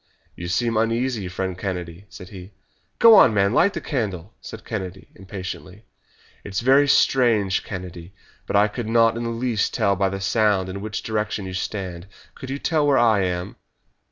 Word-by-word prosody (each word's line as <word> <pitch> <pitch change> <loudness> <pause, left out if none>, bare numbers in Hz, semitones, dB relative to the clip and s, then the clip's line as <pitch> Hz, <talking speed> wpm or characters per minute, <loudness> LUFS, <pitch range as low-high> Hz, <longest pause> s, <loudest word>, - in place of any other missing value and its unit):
"You 85 - -7
seem 115 +5 0
uneasy, 115 -1 0
friend 95 0 -4
Kennedy," 90 -1 -6
said 90 -3 -11
he. 95 0 -11 0.4
"Go 230 -1 +8
on, 130 - +7
man, 100 +1 +2
light 200 +9 +3
the - - -4
candle!" 105 - -4
said 110 - -10
Kennedy 95 -4 -6
impatiently. 95 +1 -9 0.6
"It's 100 +1 -4
very 135 +4 +4
strange, 115 -9 +3
Kennedy, 90 -2 -8 0.4
but - - -2
I 105 +1 +5
could 110 +2 -6
not 115 0 +4
in 115 - -4
the - - -2
least 115 -2 -1
tell 100 -4 +2
by 95 0 +1
the 95 0 -5
sound 100 -2 +1
in 100 +1 -6
which 110 +1 -5
direction 105 -2 -2
you 95 - -6
stand. 90 -2 -5 0.3
Could 130 - -10
you 135 - -3
tell 150 0 0
where 140 -2 +4
I 110 -4 +4
am?" 90 -1 -3
105 Hz, 180 wpm, -22 LUFS, 95-115 Hz, 0.6 s, Go